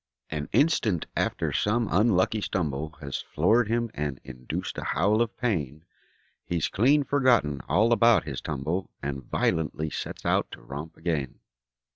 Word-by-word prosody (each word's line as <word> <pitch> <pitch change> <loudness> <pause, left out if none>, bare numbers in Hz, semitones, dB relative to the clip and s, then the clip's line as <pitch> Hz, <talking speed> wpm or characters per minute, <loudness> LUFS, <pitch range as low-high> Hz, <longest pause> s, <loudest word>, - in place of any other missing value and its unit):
An 75 -1 -3
instant 115 - +2
after - - -1
some 115 +2 +1
unlucky 105 +2 +3
stumble 80 -5 -2
Has 70 -2 -4
floored 110 +9 +2
him 115 0 0
and 75 -3 -3
induced 65 -1 -5
a - - -5
howl 100 +8 +2
of 120 -1 -1
pain, 80 - -2 0.6
He's 85 -3 -1
clean 140 +8 +3
forgotten 125 - +2
all 115 +4 +4
about 115 -1 +5
his 70 -3 -5
tumble 80 +5 -3
And 70 -1 -3
violently 80 -1 0
sets - - -6
out - - +2
to - - -10
romp 75 +6 -7
again. 80 -6 -2
85 Hz, 145 wpm, -27 LUFS, 75-115 Hz, 0.6 s, about